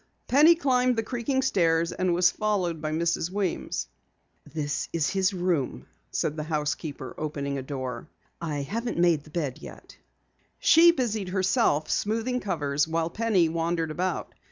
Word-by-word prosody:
Penny 305 +6 +6
climbed 255 -5 +2
the 225 - 0
creaking 260 +3 -1
stairs 165 -7 +2
and 185 -1 0
was 180 0 +4
followed 185 -7 -1
by 155 0 -2
Mrs. 165 +1 0
Weems. 190 - -2 0.6
"This 145 -2 -3
is 160 -3 0
his 190 0 +2
room," 175 -7 -1 0.2
said 150 - -1
the 155 - -3
housekeeper, 150 -2 -3
opening 140 -2 -3
a - - -4
door. 130 -3 -5 0.3
"I 150 -4 -2
haven't 230 - -3
made 170 -4 +3
the - - -14
bed 150 -5 -3
yet." - - -12 0.6
She 335 +2 +6
busied 220 - -2
herself 185 - +2
smoothing 230 +4 0
covers 150 - -1
while 165 +1 -1
Penny 210 -6 +2
wandered 165 0 -1
about. 180 +2 -2
170 Hz, 150 wpm, -27 LUFS, 155-215 Hz, 0.6 s, Penny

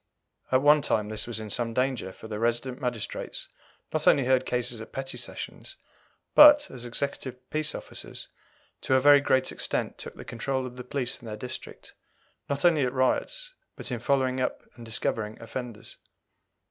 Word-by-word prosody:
At 130 +1 +4
one 150 +1 +7
time 105 -6 0
this 110 +1 -2
was 115 -2 -3
in 110 -1 -6
some 115 0 -1
danger, 130 -6 0
for 110 - -11
the 105 -1 -4
resident 120 +3 0
magistrates 120 -5 -3 0.5
not - - -1
only 135 - +6
heard 130 0 +3
cases 120 -2 -1
at 110 - -10
petty 135 0 -5
sessions, - - -7 0.6
but, 295 0 +9
as 125 -2 -7
executive 130 0 -3
peace 155 0 +1
officers, - - -6 0.5
to 130 - +2
a - - +6
very 145 +1 +7
great 130 -2 +2
extent - - -2
took - - -7
the - - -10
control 130 +3 -2
of 125 -1 -8
the 125 - -7
police 125 0 -2
in 115 - -10
their 105 -1 -5
district, 125 +3 -8 0.6
not 140 +3 -1
only 160 -5 +5
at 125 - +1
riots, - - 0 0.2
but - - -5
in 120 - -2
following 130 +1 +1
up 130 - -2
and 120 -1 -11
discovering 110 -1 -2
offenders. 115 -1 -7
125 Hz, 175 wpm, -27 LUFS, 115-135 Hz, 0.6 s, but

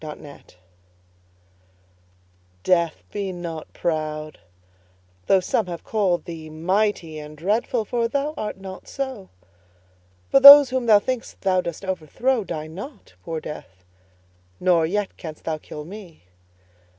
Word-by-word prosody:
Death 150 - -11 2.1
DEATH, 170 -3 +1
be 200 -2 -3
not 170 -3 -7
proud, 155 -2 -3 0.9
though 195 - +5
some 185 +2 -1
have 170 -2 -6
called 195 -5 0
thee 160 -2 -8
Mighty 170 0 -1
and 150 0 -10
dreadful, 215 +6 0
for 235 +1 0
thou 280 +5 -2
art 210 -2 -5
not 190 -1 -9
so: 260 -8 -5 1.0
For 275 - +4
those 280 -1 +11
whom 255 -2 -1
thou 215 -2 +8
think'st 245 +3 -4
thou 185 -2 +2
dost 170 +2 -6
overthrow 200 - -1
Die 160 -4 -5
not, 190 - -10
poor 160 - -4
Death; 95 -13 -10 0.8
nor 175 -3 +3
yet 205 +3 -2
canst 155 -3 -9
thou 160 -1 -3
kill 150 0 -9
me. 185 - -11
185 Hz, 125 wpm, -23 LUFS, 155-215 Hz, 2.1 s, those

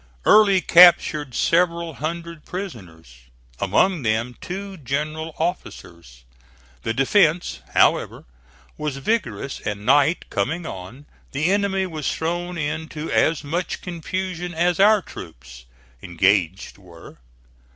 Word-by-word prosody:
Early 200 -3 +6
captured 160 -6 +5
several 170 -1 +1
hundred 165 +4 -6
prisoners, 90 - -9 0.4
among 150 - +2
them 115 +1 -1
two 195 +2 -6
general 155 +3 -4
officers. 85 - -6 0.6
The 115 - -2
defence, 160 - +2 0.2
however, - - +2 0.5
was 150 -3 -3
vigorous; 140 - -2
and 105 0 -5
night 145 +6 +3
coming 160 - -2
on, 115 - -9 0.3
the 155 +6 +1
enemy 200 -1 +1
was 155 -5 -3
thrown 175 +2 -3
into 155 +1 -4
as 160 -1 +2
much 170 +5 -3
confusion 180 0 -5
as 175 +2 +1
our 210 0 +5
troops, - - -12 0.4
engaged, 95 +2 0
were. 85 -4 -15
155 Hz, 110 wpm, -22 LUFS, 115-175 Hz, 0.6 s, Early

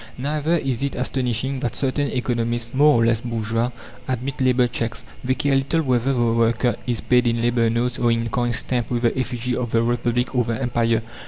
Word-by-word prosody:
Neither 150 +4 -1
is 135 -7 -1
it 140 0 -2
astonishing 130 +1 -1
that 120 -3 -2
certain 140 +1 0
economists, 120 -2 -2
more 145 -1 +5
or 115 - +3
less 115 -1 +2
bourgeois, 115 0 -1 0.4
admit 130 +1 -3
labour 130 -1 +3
cheques. 115 -1 -4 0.2
They 130 +1 +1
care 145 -1 +1
little 140 +5 +1
whether 130 -1 +1
the 130 - 0
worker 115 +1 +2
is 120 -2 -1
paid 125 0 +3
in 115 0 +1
labour 115 0 +2
notes 120 +2 -1
or 120 -1 +3
in 115 0 0
coin 120 +1 0
stamped 120 0 -1
with 120 -1 -1
the 120 - +2
effigy 125 -1 -2
of 120 -1 -2
the 115 0 +2
Republic 120 +1 0
or 125 -1 +2
the 115 0 -3
Empire. 115 -3 +1
120 Hz, 200 wpm, -22 LUFS, 115-130 Hz, 0.4 s, more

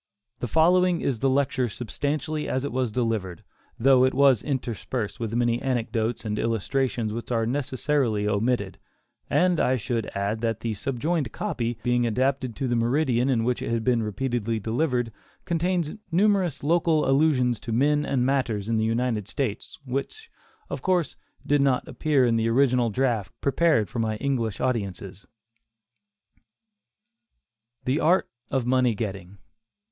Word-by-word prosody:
The 120 - -3
following 175 +5 +3
is 125 -5 -1
the 135 - +2
lecture 130 -2 +1
substantially 145 +7 -3
as 130 +1 -1
it - - -3
was 125 -2 -1
delivered, 110 -7 -2 0.3
though 130 +1 +5
it 130 - +2
was 135 -6 +5
interspersed 125 -4 -3
with 115 -1 -3
many 120 0 +1
anecdotes 115 -3 -1
and 105 -1 -2
illustrations 115 0 -1
which 115 +2 -6
are 115 -2 +1
necessarily 130 -3 0
omitted; 105 -1 0 0.5
and 180 -2 +3
I 130 - +3
should 120 -1 -2
add, 100 +3 -1
that 115 -2 -1
the 115 -1 -2
subjoined 135 +5 -2
copy 120 -1 -3
being 120 -1 +2
adapted 130 +1 0
to 135 - -2
the 120 - 0
meridian 125 +1 +1
in 120 -4 +2
which 125 +1 0
it - - -3
has 115 -1 0
been 120 0 +2
repeatedly 115 +1 -2
delivered, 120 +2 -1 0.3
contains 170 -1 0 0.2
numerous 190 -4 +2
local 160 -1 +2
allusions 135 -5 +3
to 115 - -6
men 145 +5 +2
and 130 -4 0
matters 125 -7 0
in 115 0 +1
the 110 - +1
United 115 -2 -1
States, 115 -2 -4
which, 140 - -5 0.4
of - - -5
course, 180 -4 0 0.3
did 145 -1 +3
not 135 -2 +1
appear 145 -5 +1
in 115 -1 +2
the 115 0 +1
original 125 -1 +3
draft 115 -4 0
prepared 140 -6 +2
for 120 - -5
my 110 -1 0
English 115 -4 -2
audiences: 100 -5 -3 2.6
THE 130 +4 +1
ART 180 +4 +3 0.2
OF 130 -3 0
MONEY 125 -2 +2
GETTING. 100 -3 -5
125 Hz, 150 wpm, -25 LUFS, 115-140 Hz, 2.6 s, though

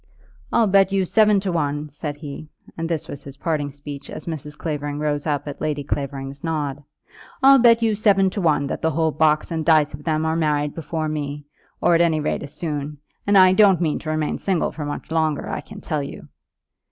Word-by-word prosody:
"I'll 235 - +4
bet 195 -1 +4
you 195 -1 +1
seven 210 +1 +4
to 190 -1 -2
one," 150 -2 -1
said 145 +1 -5
he, 150 0 -8 0.3
and 165 0 -4
this 160 -2 -2
was 140 -1 -8
his 140 -1 -10
parting 150 -2 -1
speech 145 0 -9
as - - -7
Mrs. 150 -2 -6
Clavering 145 -2 -3
rose 150 0 -1
up 145 -1 -1
at 145 - -7
Lady 145 -2 -1
Clavering's 140 -1 -4
nod, 145 -3 -2 0.6
"I'll 270 0 +8
bet 235 -1 +5
you 225 -1 +3
seven 195 -2 +3
to 200 - -3
one, 155 -4 +2
that - - -4
the 160 - +2
whole 160 +1 +1
box 155 +1 +2
and 160 -1 -1
dice 155 -3 +4
of 145 +1 -9
them 155 0 0
are 160 0 0
married 150 -2 0
before 160 0 -3
me, 145 -1 -4 0.4
or - - +4
at 165 - +4
any 165 -2 +3
rate 150 - -1
as 145 - -7
soon; 150 -2 -4 0.3
and 205 0 +5
I 185 -1 +7
don't 195 -3 +5
mean 160 -4 0
to 155 - -6
remain 155 -1 -1
single 190 -4 0
much 145 0 -5
longer, 160 -2 0
I - - -3
can 210 -1 -12
tell 155 -3 -2
you." 140 - -8
155 Hz, 215 wpm, -22 LUFS, 145-170 Hz, 0.6 s, I'll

